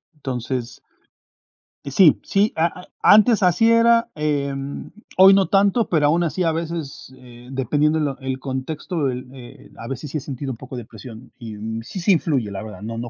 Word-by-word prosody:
Entonces 125 -3 -5 1.1
Sí, 150 +3 +4
sí, 205 +2 +1
a 170 +2 -1
e - - -17
antes 215 0 +5
así 185 +6 +3
era, 230 0 +4
em, 140 -2 -3 0.3
hoy 190 +1 +8
no 195 -1 +3
tanto, 200 +3 +2
pero 155 -4 +2
aún 170 +4 +2
así 175 +3 -1
a 165 -1 +1
veces, 160 -5 -6
eh, 125 0 -15
dependiendo 150 +4 +1
lo 140 -3 -2
el 130 -1 -4
contexto 145 +4 -4
del, 125 0 -4
eh, 125 -2 -13
a 115 - -8
veces 135 +2 -6
sí 155 - -2
he - - -5
sentido 135 0 -5
un - - -11
poco 130 0 -9
de 120 - -7
presión, 115 +2 -12
y 110 -3 -8 0.3
sí, 190 - -7
sí 185 +3 +3
influye, 135 - -1
la 100 +2 -6
verdad, 105 -1 -10
no 115 +2 -6
no 120 +1 -5
145 Hz, 190 wpm, -21 LUFS, 125-175 Hz, 1.1 s, hoy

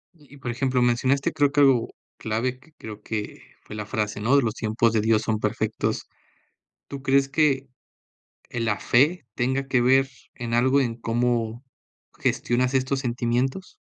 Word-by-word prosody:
Y 145 -3 -18
y, - - -14
por 130 -3 -4
ejemplo, 130 +1 0
mencionaste 130 +6 +1
creo 145 -3 +2
que, 145 0 +3
algo 135 -4 +4 0.3
clave 120 +4 -2
que, 145 +5 -23
creo 105 -1 -9
que 105 -1 -5 0.2
fue - - -10
la 105 -1 -5
frase, 105 -3 -2
¿no?, 120 +6 +3
de: 140 - +4
"Los 110 -2 -1
tiempos 110 0 0
de 110 - +2
Dios 110 0 +2
son 110 -1 -1
perfectos". 110 0 -2 0.8
¿Tú 140 -1 -7
crees 135 0 +3
que, 140 -2 +1 0.8
eh, 120 - -4
la 105 -3 0
fe 145 - +2
tenga 130 +3 -1
que 130 -2 +2
ver 135 +2 +4 0.3
en 115 -1 -4
algo 130 +4 +3
en 120 -4 -1
cómo 120 +1 -1 0.5
gestionas 125 +2 0
estos 130 +1 +1
sentimientos? 125 +6 -2
125 Hz, 170 wpm, -24 LUFS, 115-135 Hz, 0.8 s, algo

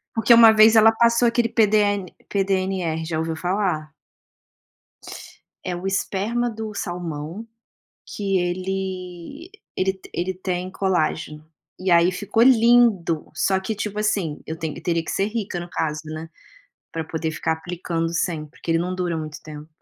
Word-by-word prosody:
Porque 225 +1 +5
uma 225 -1 +8
vez 220 +1 +7
ela 225 +1 +7
passou 235 +1 +3
aquele 235 0 +1
PDN 205 -3 +2 0.2
PDNR, 190 -4 -1
já 160 -1 -3
ouviu 160 0 -2
falar? 175 -4 -2 1.7
É 180 - -3
o 180 +2 -5
esperma 210 +5 -1
do 220 -1 -6
salmão, 175 +2 -5 0.6
que 195 -2 -1
ele, 185 - -4 0.3
ele 190 +1 +1
te 190 - -16
ele 185 +2 -2
tem 185 0 -3
colágeno. 155 -5 -1 0.3
E 185 +1 -2
aí 170 +1 +5
ficou 205 +5 +1
lindo, 230 -9 +4
só 190 +3 +1
que 215 +3 -4
tipo 210 0 -4
assim, 195 -8 -1
eu 160 - -5
tenho 160 -1 -5
teria 165 -1 0
que - - -5
ser 195 - +1
rica 210 -5 -3
no 175 0 -7
caso, 150 -3 -2
né. 155 +1 -7 0.6
Para 165 -1 -3
poder 160 0 -3
ficar 160 +1 -1
aplicando 165 0 -3
sempre, 160 -3 -2
porque 165 - -7
ele 165 - +3
não 180 +2 -2
dura 175 -2 -2
muito 155 -1 -6
tempo. 150 0 -10
185 Hz, 155 wpm, -23 LUFS, 165-210 Hz, 1.7 s, uma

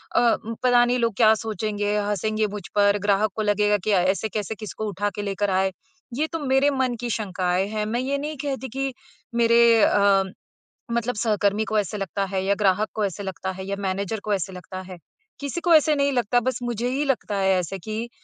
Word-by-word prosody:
अ, - - +6 0.3
म 230 - -4
पता 245 -1 +5
नहीं 245 +1 +1
लोग 230 -1 +1
क्या 220 -2 +6
सोचेंगे, 210 -1 -2
हँसेंगे 210 +1 0
मुझ 205 0 -7
पर, 205 0 +4
ग्राहक 205 +1 +2
को 220 - -2
लगेगा 210 0 +2
कि 215 - +1
अ, 190 -3 +4
ऐसे 195 +4 0
कैसे 210 0 -3
किसको 215 0 -6
उठा 205 +1 -1
के 205 - -3
लेकर 200 0 -1
आए। 190 0 +1 0.4
ये 305 +4 0
तो 330 0 -4
मेरे 270 0 +3
मन 260 -3 0
की 240 - -3
शंकाएँ 185 -3 -1
हैं, 215 0 -2
मैं 235 +3 -1
ये 275 +2 -1
नहीं 300 +1 -5
कहती 265 -2 -3
कि 270 0 -1 0.4
मेरे 235 -1 +5
अ, 200 -1 +4 0.7
मतलब 235 +1 -1
सहकर्मी 210 -2 +1
को 220 - -1
ऐसे 205 +1 -3
लगता 195 0 -2
है 190 -1 -1
या 200 - +3
ग्राहक 205 +1 +2
को 215 - 0
ऐसे 200 +1 -4
लगता 190 0 -4
है 190 0 -7
या 200 - -2
मैनेजर 200 +2 -2
को 210 - -1
ऐसे 190 0 -2
लगता 185 +1 -8
है। 185 - -8 0.4
किसी 285 +4 -4
को 345 -2 +3
ऐसे 305 0 +4
नहीं 280 0 +2
लगता, 245 -1 +2
बस 255 +2 -2
मुझे 240 0 -2
ही 275 +3 -1
लगता 250 -6 -1
है 195 0 +2
ऐसे 185 +2 -4
कि 220 +5 -5
215 Hz, 215 wpm, -24 LUFS, 200-240 Hz, 0.7 s, अ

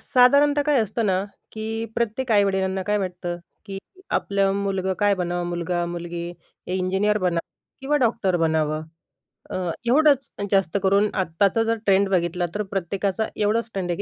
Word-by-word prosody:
साधारणतः 285 +3 +4
काय 290 -3 +3
असतं 220 +1 -1
ना, 185 -1 +2 0.3
की 220 0 -5 0.3
प्रत्येक 235 +2 -1
आई-वडिलांना 190 -2 +2
काय 210 0 +2
वाटतं 180 -2 -3 0.3
की 195 -1 -5 0.4
आपलं 195 -1 0
मुलगं 190 -1 -1
काय 205 -1 +3
बनावं, 175 0 -1
मुलगा-मुलगी, 175 0 -3 0.5
इंजिनियर 190 +3 +1
बनावं 175 -3 -1 0.3
किंवा 280 +3 +1
डॉक्टर 225 -8 +1
बनावं. 155 -2 +1 0.7
अ - - -3 0.3
एवढंच 280 +1 +4 0.2
जास्त 195 -2 +2
करून. 200 +2 +3
आत्ताचा 190 +4 +1
जर 225 0 0
ट्रेंड 195 0 +4
बघितला 175 -1 0
तर 210 - 0
प्रत्येकाचा 195 +3 -1
एवढंच 220 +3 0
ट्रेंड 185 -2 -3
आहे 170 - -2
195 Hz, 140 wpm, -23 LUFS, 175-220 Hz, 0.7 s, साधारणतः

